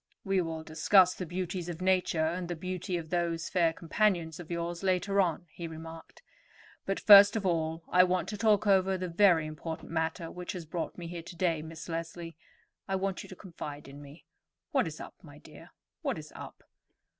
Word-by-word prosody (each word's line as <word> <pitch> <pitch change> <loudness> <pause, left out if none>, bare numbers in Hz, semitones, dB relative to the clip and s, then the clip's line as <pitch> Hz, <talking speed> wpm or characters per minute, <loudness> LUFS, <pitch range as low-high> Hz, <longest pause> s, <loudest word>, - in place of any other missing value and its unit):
"We 195 -1 +1
will 160 -2 -4
discuss 180 +4 +4
the 180 - -6
beauties 180 0 -4
of 170 -1 -5
nature 185 -3 +2
and 175 +2 -2
the 175 - -3
beauty 180 +1 -3
of 160 -1 -7
those 170 -1 -1
fair 170 -3 +3
companions 170 -1 0
of 175 - -9
yours 170 0 -3
later 195 +1 +2
on," 175 -1 -1
he 170 +1 -6
remarked. 160 - -10 0.6
"But 195 - -1
first 205 0 +9
of 210 -3 -2
all 165 -2 -1
I 180 - +5
want 180 0 0
to 210 - -4
talk 215 -1 +3
over 190 -1 +3
the 185 0 -3
very 175 -2 +4
important 155 +2 -7
matter 165 0 -2
which 180 +2 -6
has 175 -3 -6
brought 165 +2 -4
me 175 - -7
here 170 0 -6
to 170 +2 -11
day. 165 -3 0
Miss 160 0 -9
Leslie, 165 0 -5 0.5
I 195 - -1
want 190 0 -2
you - - -12
to 185 - -9
confide 150 -7 -8
in 140 +1 -11
me. 145 +3 -14 0.5
What - - +2
is - - -7
up, - - -8
my - - -14
dear—what - - -8
is - - -10
up?" - - -10
175 Hz, 195 wpm, -30 LUFS, 165-185 Hz, 0.6 s, first